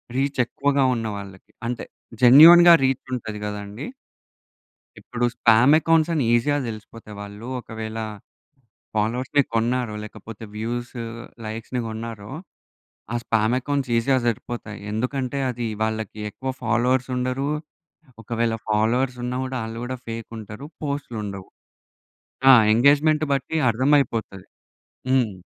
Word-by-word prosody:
Reach 135 +1 -1
ఎక్కువగా 140 +3 0
ఉన్న 115 -1 -3
వాళ్ళకి. 95 -1 -11 0.2
అంటే 120 -1 -4 0.4
జెన్యూన్‌గా 170 +7 +10
రీచ్ 130 -1 0
ఉంటది 110 -3 -6
కదండీ. 105 +4 -6 1.1
ఇప్పుడు 120 0 -2
స్పామ్ 115 +5 +5
అకౌంట్స్ 165 0 +2
అని 150 -5 +1
ఈజీగా 145 +5 +2
తెలిసిపోతాయి. 110 -1 -9
వాళ్ళు 105 +3 -9
ఒకవేళ 110 -1 -7 1.0
ఫాలోవర్స్‌ని 125 +6 +1
కొన్నారో, 120 0 0
లేకపోతే 115 +1 -10
వ్యూస్ 120 +3 -4 0.5
లైక్స్‌ని 115 +3 -4
కొన్నారో 110 -1 -7 0.8
ఆ - - +1
స్పామ్ 110 +1 +1
అకౌంట్స్ 140 -1 -2
ఈజీగా 130 +3 +2
దొరికిపోతాయి. 115 -2 -4
ఎందుకంటే 125 +4 -2
అది 120 -1 -4 0.2
వాళ్ళకి 110 -1 -3
ఎక్కువ 130 +4 -5
ఫాలోవర్స్ 125 +2 +1
ఉండరు. 130 +3 -1 0.7
ఒకవేళ 115 0 -1
ఫాలోవర్స్ 120 +4 +1
ఉన్నా 125 +1 -2
గూడా 130 0 -4
ఆళ్ళు 115 +1 -6
గూడా 130 +1 -4
ఫేక్ 115 -1 -6
ఉంటారు. 110 +6 -9 0.2
పోస్ట్‌లుండవు. 110 -9 -5 1.0
ఆ! - - +11 0.2
ఎంగేజ్మెంట్ 145 +5 +4
బట్టి 140 +4 -3
అర్థం 130 +6 +1
అయిపోతది. 110 -7 -3 0.6
హ్మ్. 120 -8 +1
120 Hz, 115 wpm, -23 LUFS, 110-130 Hz, 1.1 s, ఆ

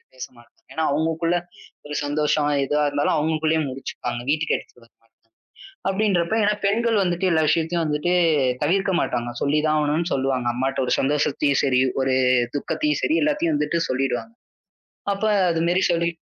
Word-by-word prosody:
பேசமாட்டாங்க. 120 -2 -11 0.2
ஏன்னா 160 - -1
அவங்களுக்குள்ள 165 +3 0 0.5
ஒரு 150 - -7
சந்தோஷம் 150 0 0
இதா 150 +2 0
இருந்தாலும் 145 +2 0
அவங்களுக்குள்ளேயே 155 +1 0
முடிச்சுப்பாங்க. 130 -2 -5
வீட்டுக்கு 155 0 0
எடுத்துட்டு 120 - -16
வரமாட்டாங்க. 115 - -27 0.9
அப்படின்றப்போ, 195 -2 +1
ஏன்னா 210 +1 +3
பெண்கள் 225 +3 +1
வந்துட்டு 180 0 -1
எல்லா 160 -1 +3
விஷயத்தையும் 165 +2 +1
வந்துட்டு 150 +3 0 0.5
தவிர்க்க 190 +6 +1
மாட்டாங்க. 120 -6 -2
சொல்லிதான் 150 +2 +1
ஆகணும்னு 150 +4 0
சொல்லுவாங்க. 130 -2 -1
அம்மாட்ட 135 +2 -2
ஒரு - - 0
சந்தோஷத்தையும் 145 0 +1
சரி, 130 -2 +2 0.2
ஒரு 130 0 +1 0.4
துக்கத்தையும் 300 - -1
சரி 320 - +1
எல்லாத்தையும் 300 +2 +1
வந்துட்டு 170 -12 0
சொல்லிடுவாங்க. 130 - -2 0.8
அப்ப 200 - -5 0.3
அது 165 -1 0
மாரி 180 +2 +2
சொல்லி 170 0 +1
155 Hz, 140 wpm, -22 LUFS, 140-175 Hz, 0.9 s, ஏன்னா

